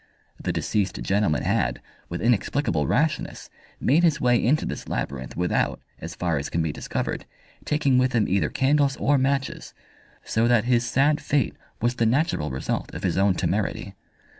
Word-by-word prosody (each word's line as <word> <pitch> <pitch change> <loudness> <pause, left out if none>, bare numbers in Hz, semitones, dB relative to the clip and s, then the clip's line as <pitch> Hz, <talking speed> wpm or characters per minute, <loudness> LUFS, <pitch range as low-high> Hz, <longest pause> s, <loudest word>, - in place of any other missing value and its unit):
The - - -1
deceased 100 -4 -1
gentleman 95 - +1
had, - - 0 0.3
with 85 - -4
inexplicable 115 - +1
rashness, 155 - -1 0.3
made 150 +7 +3
his 165 -3 +3
way 125 -2 +3
into 145 +6 +2
this - - -5
labyrinth 65 -1 -4
without, 90 0 0 0.2
as 85 +2 -7
far 85 -4 0
as 70 - -5
can 85 - 0
be 80 - -1
discovered, - - -4 0.4
taking 145 -4 +2
with 130 0 +1
him 115 -3 +2
either 95 +1 +1
candles 140 0 +2
or 145 -1 +2
matches, 135 +1 -1 0.5
so 115 +1 +1
that 120 -3 +4
his 120 0 +2
sad 145 +5 +2
fate 140 -6 0 0.3
was 120 +1 +1
the 115 - +2
natural 130 - +1
result 65 0 -3
of - - -6
his - - 0
own 95 -1 +3
temerity. - - -2
120 Hz, 165 wpm, -24 LUFS, 90-140 Hz, 0.5 s, that